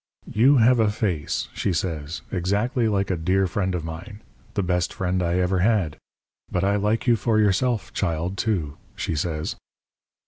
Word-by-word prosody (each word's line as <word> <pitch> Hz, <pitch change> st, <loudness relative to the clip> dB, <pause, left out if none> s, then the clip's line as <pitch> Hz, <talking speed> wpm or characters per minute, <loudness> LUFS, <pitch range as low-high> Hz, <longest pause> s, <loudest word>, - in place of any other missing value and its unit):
"'You 130 Hz, +6 st, +5 dB
have 120 Hz, +1 st, +5 dB
a 110 Hz, -2 st, +4 dB
face,' 95 Hz, -8 st, -1 dB
she 100 Hz, -, -1 dB
says, 80 Hz, -4 st, -3 dB
'exactly 105 Hz, +7 st, 0 dB
like 100 Hz, -2 st, 0 dB
a -, -, +1 dB
dear 95 Hz, +4 st, +1 dB
friend 95 Hz, 0 st, -1 dB
of 85 Hz, -2 st, -3 dB
mine 90 Hz, +7 st, -8 dB, 0.3 s
the 100 Hz, -, +1 dB
best 90 Hz, -1 st, 0 dB
friend 95 Hz, 0 st, -1 dB
I 85 Hz, 0 st, 0 dB
ever 90 Hz, +1 st, +1 dB
had. 95 Hz, -6 st, +2 dB, 0.6 s
But 90 Hz, -, 0 dB
I 100 Hz, +1 st, +2 dB
like 105 Hz, +2 st, 0 dB
you 120 Hz, -2 st, +5 dB
for 110 Hz, +1 st, +1 dB
yourself, 110 Hz, +2 st, +1 dB
child, 85 Hz, 0 st, -1 dB
too,' 90 Hz, -11 st, -1 dB, 0.2 s
she -, -, -2 dB
says. 75 Hz, 0 st, -2 dB
95 Hz, 170 wpm, -24 LUFS, 85-105 Hz, 0.6 s, You